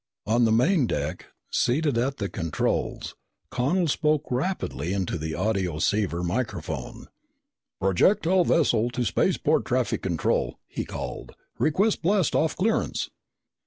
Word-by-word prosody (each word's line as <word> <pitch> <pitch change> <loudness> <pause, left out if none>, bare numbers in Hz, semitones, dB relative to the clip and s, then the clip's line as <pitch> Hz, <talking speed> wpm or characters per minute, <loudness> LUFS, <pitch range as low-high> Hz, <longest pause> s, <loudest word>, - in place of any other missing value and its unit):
On 115 +3 +3
the 110 - +3
main 130 - +3
deck, - - -3 0.2
seated 145 +2 +1
at 130 +4 0
the 100 - -2
controls, 85 -5 -2 0.4
Connel 165 +8 +1
spoke 150 -1 +1
rapidly 125 - -2
into 95 -3 -1
the 80 -1 -3
audioceiver 95 -1 0
microphone. 115 +8 -3 0.7
"Projectile 170 - +3
vessel 120 -9 +2
to 125 0 -2
spaceport 95 - +2
traffic - - 0
control," - - 0
he - - -5
called. - - -6 0.3
"Request 195 +8 +2
blast 190 0 +2
off 160 - +1
clearance!" 220 +5 0
125 Hz, 120 wpm, -26 LUFS, 100-160 Hz, 0.7 s, On